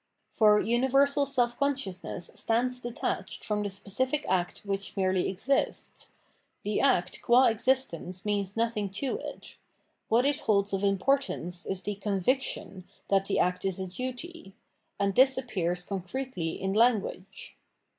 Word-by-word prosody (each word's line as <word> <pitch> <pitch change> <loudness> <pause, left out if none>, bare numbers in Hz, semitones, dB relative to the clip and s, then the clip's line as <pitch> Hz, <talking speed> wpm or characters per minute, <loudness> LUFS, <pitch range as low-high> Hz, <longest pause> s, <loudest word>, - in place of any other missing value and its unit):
For 210 -2 +5
universal 275 +5 +3
self 240 -3 0
consciousness 260 -11 -2
stands 250 +2 0
detached 240 -1 -4
from 210 -1 0
the 205 - -2
specific 235 +9 -2
act 180 +1 -1
which 195 0 -4
merely 185 -1 +1
exists: 255 +9 -2 0.5
the 210 0 0
act 180 -10 +2
qua 245 +2 +5
existence 220 -6 -1
means 205 -1 -1
nothing 225 -3 0
to 260 +7 -2
it: - - -9 0.5
what 240 +3 +4
it 285 0 +1
holds 200 -2 +1
of 195 +1 -1
importance 195 - 0
is 190 -1 -3
the 205 - -2
conviction 200 -1 -1 0.2
that 195 -1 +3
the - - 0
act 180 0 +1
is 190 -2 -1
a 190 - -3
duty; 255 - -7 0.4
and 200 -1 +1
this 260 +4 +5
appears 180 -8 -2
concretely 190 -1 -4
in 190 0 -1
language. 205 -4 0
210 Hz, 135 wpm, -29 LUFS, 190-255 Hz, 0.5 s, For